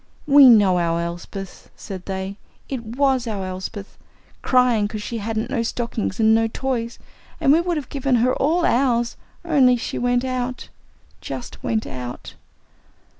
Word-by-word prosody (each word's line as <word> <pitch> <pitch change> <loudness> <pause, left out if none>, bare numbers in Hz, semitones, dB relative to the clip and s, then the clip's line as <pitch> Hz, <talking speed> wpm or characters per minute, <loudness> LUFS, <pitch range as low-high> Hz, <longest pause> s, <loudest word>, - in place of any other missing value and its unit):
"We 280 -3 +8
know 200 -6 +5
our 170 -1 0
Elsbeth," 175 +3 -7
said 185 -2 -8
they. 190 +1 -4 0.3
"It 260 -4 -4
was 255 +2 0
our 200 -4 -3
Elsbeth, 190 +2 -7 0.4
cryin' 250 -5 +3
'cause 210 0 -6
she 230 +1 -4
hadn't 220 +3 -3
no 250 -4 0
stockin' 230 -1 -2
an' 220 -1 +4
no 225 0 +3
toys, 240 0 -3 0.4
and 275 - +3
we 325 - +4
would 345 -1 -1
have 285 -5 -5
given 275 -2 0
her 245 +2 +2
all 335 +5 +1
ours, 240 -2 +1 0.3
only 265 -7 +4
she - - -4
went 245 +1 +1
out 255 -1 -3 0.5
jus' - - -6
went 220 -1 -1
out!" 125 -1 -7
235 Hz, 155 wpm, -22 LUFS, 205-255 Hz, 0.5 s, We